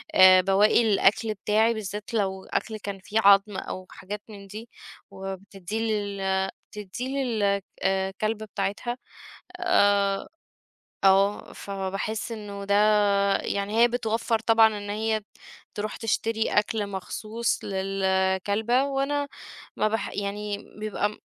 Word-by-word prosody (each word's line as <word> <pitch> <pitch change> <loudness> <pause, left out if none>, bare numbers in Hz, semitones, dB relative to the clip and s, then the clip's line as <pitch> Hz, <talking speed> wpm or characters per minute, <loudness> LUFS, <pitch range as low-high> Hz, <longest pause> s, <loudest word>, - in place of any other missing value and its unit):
آآ 185 0 +8
بواقي 195 +5 +4
الأكل 215 +3 +3
بتاعي 215 +3 +2
بالذات 210 0 -6
لو 190 -3 -1
أكل 220 -2 -3
كان 200 -2 -6
فيه 210 +4 -1
عضم 200 -1 +5
أو 185 0 -6
حاجات 205 +2 -7
من 200 -2 -11
دي، 220 +4 -9 0.4
وبتدّيه 195 +1 -6
لل 200 -3 -1 0.2
تدّيه 210 +4 -6 0.2
لل 205 -5 +1 0.2
آآ، 190 0 +1
كلبة 215 0 -1
بتاعتها. 205 +4 -3 0.6
آآ، 200 - +2 0.8
آه، 195 +1 +3
فباحس 195 +3 -4
إنه 205 -2 -7
ده 200 - +2 0.6
يعني 200 +2 -2
هي 240 - +8
بتوفّر 230 -1 0
طبعًا 225 0 +5
إن 205 - -7
هي 220 +1 0 0.5
تروح 210 +1 -3
تشتري 225 0 0
أكل 210 0 +1
مخصوص 215 +4 -3
للكلبة 195 +4 +1
وأنا 280 +1 -1 0.5
ما 215 - +2
بح 225 -1 -2
يعني 205 0 -3 0.2
بيبقى 210 0 -2
205 Hz, 120 wpm, -26 LUFS, 195-220 Hz, 0.8 s, آآ